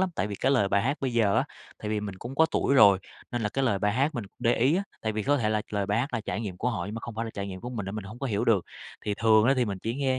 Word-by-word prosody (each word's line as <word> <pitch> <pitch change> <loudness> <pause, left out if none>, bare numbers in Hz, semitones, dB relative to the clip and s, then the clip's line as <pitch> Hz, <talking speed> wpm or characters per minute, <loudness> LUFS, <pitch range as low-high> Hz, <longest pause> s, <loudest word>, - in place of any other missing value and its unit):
lắm. 190 - +2
Tại - - 0
vì 105 - -5
cái 135 +7 +1
lời 105 -8 +3
bài 100 0 +2
hát 140 +5 -1
bây 130 -2 -1
giờ 110 -4 +3
á, - - +3 0.3
tại 105 - -5
vì 105 0 0
mình 100 -2 -5
cũng 120 +6 -7
có 160 +3 +5
tuổi 140 - +1
rồi, 100 -8 +7 0.3
nên 120 -2 -2
là 105 - +1
cái 135 +5 -1
lời 105 -6 +2
bài 105 0 +1
hát 140 +6 +1
mình 120 - -3
để 115 - +2
ý 135 +8 +3
á. 195 - 0 0.2
Tại 110 - -1
vì 110 0 -2
có 145 +6 +2
thể 115 -6 0
là 105 -1 0
lời 100 -2 -1
bài 105 +2 +1
hát 130 +4 -1
là 115 - 0
trải 105 - -3
nghiệm 100 -5 -5
của 125 +5 -1
họ 90 -7 -3
nhưng 105 - -6
mà 115 - -5
không 115 0 -7
phải 115 +1 -2
là 115 - -5
trải 100 0 -3
nghiệm 95 -1 -7
của 120 - -6
mình 105 -6 -4
mình 105 -2 -5
hổng 105 +5 -9
có 135 - -3
hiểu 105 -5 0
được. 105 -6 +3 0.4
Thì 105 - -1
thường 110 0 +4
á 135 - +5
thì 125 - +3
mình 100 -4 -4
chỉ 115 +1 -2
ngheơ 130 -1 0
110 Hz, 360 wpm, -27 LUFS, 105-125 Hz, 0.4 s, rồi